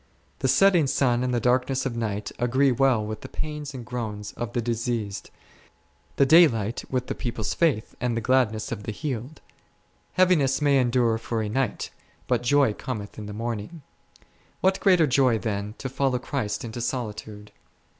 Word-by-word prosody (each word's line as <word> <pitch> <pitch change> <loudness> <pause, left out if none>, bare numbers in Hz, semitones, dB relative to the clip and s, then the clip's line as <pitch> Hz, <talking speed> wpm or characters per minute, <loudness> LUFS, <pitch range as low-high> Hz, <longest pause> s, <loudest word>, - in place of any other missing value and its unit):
The 130 - 0
setting 175 +1 +4
sun 125 -2 +2
and 125 - 0
the 120 - +1
darkness 130 +3 +1
of 130 -3 -2
night 105 -3 -3
agree 130 +3 +3
well 125 -3 +2
with 110 0 -5
the - - -9
pains 150 -2 -5
and 125 -2 -7
groans 110 -4 -5
of 120 -1 -5
the 120 - 0
diseased; 115 -3 -2 0.9
the 140 - +4
daylight 125 - +4
with 125 -1 -1
the - - -3
people's 115 -3 -3
faith 150 -11 +1
and 120 -1 0
the - - +2
gladness 115 -3 +1
of - - -4
the 105 - -5
healed; 130 +3 -5 0.7
heaviness 170 -8 +3
may 145 -2 +3
endure 120 -2 +2
for 115 -1 -2
a 105 - -3
night, 125 0 -2 0.4
hut 125 -2 +1
joy 135 -2 +3
cometh 105 -3 -6
in 105 - -7
the - - -6
morning; 115 +7 -5 0.8
what 190 +1 +2
greater 180 -5 +5
joy 130 -4 +3
than 105 0 -3
to - - -5
follow 135 0 0
Christ 120 -4 -3
into 115 +1 -6
solitude 110 -4 -5
120 Hz, 170 wpm, -25 LUFS, 110-135 Hz, 0.9 s, greater